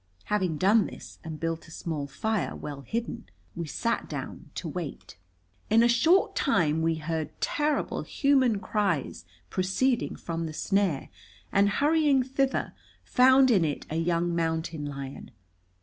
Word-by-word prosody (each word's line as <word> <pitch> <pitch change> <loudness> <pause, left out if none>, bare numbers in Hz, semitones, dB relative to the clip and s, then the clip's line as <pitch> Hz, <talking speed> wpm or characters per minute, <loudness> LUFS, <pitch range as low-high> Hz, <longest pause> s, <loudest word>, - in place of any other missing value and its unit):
Having 185 -7 0
done 200 +5 +4
this, - - -11
and 160 -2 -6
built 165 0 -3
a - - -14
small 160 -3 -4
fire, 210 +9 -2
well 145 -2 -7
hidden, 230 - -4 0.3
we 170 -1 -4
sat 230 +9 -1
down - - -6
to 175 - -4
wait. 150 - -6 0.5
In 225 +2 +5
a - - +6
short 320 +11 +4
time 160 - +2
we 165 0 +2
heard 160 0 -4
terrible 295 0 0
human 265 -7 +2
cries 195 - -1 0.3
proceeding 230 +7 0
from 165 -1 -4
the 155 - -7
snare, 195 -4 0 0.4
and, 200 +1 +4
hurrying 290 +2 +3
thither, 270 +1 -1 0.3
found 260 +1 +5
in 195 -7 +4
it 150 -3 -2
a - - -2
young 170 +1 +1
mountain 160 -2 -1
lion. 140 -1 -7
180 Hz, 145 wpm, -28 LUFS, 160-235 Hz, 0.5 s, a